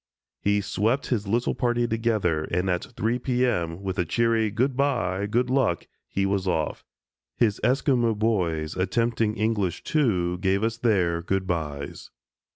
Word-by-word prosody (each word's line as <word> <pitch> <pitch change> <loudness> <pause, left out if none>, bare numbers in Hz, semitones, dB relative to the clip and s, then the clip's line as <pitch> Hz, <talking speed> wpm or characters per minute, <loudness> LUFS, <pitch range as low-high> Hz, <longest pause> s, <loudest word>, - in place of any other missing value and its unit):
He 100 0 +2
swept 110 +7 0
his 105 -4 -2
little 120 +4 +1
party 120 -2 +1
together 110 -9 0
and 90 +2 0
at 90 - -1
three 115 +4 0
P. 125 0 +1
M., 85 -6 -1
with 95 0 -3
a - - +3
cheery 115 +5 +1
"Good 125 +5 0
by! 100 -9 0
Good 120 +4 +1
Luck!" 130 - +1 0.2
he 95 - -1
was 95 -1 0
off. 80 -4 -1 0.5
His 105 -4 +2
Esquimo 125 -2 +2
boys, 90 -8 0
attempting 110 +3 0
English, 105 -5 0
too, 90 - +1
gave 95 +2 +1
us 115 0 0
their 90 -8 +1
"Good 95 +2 -1
bys." 75 -5 -4
105 Hz, 155 wpm, -25 LUFS, 90-120 Hz, 0.5 s, a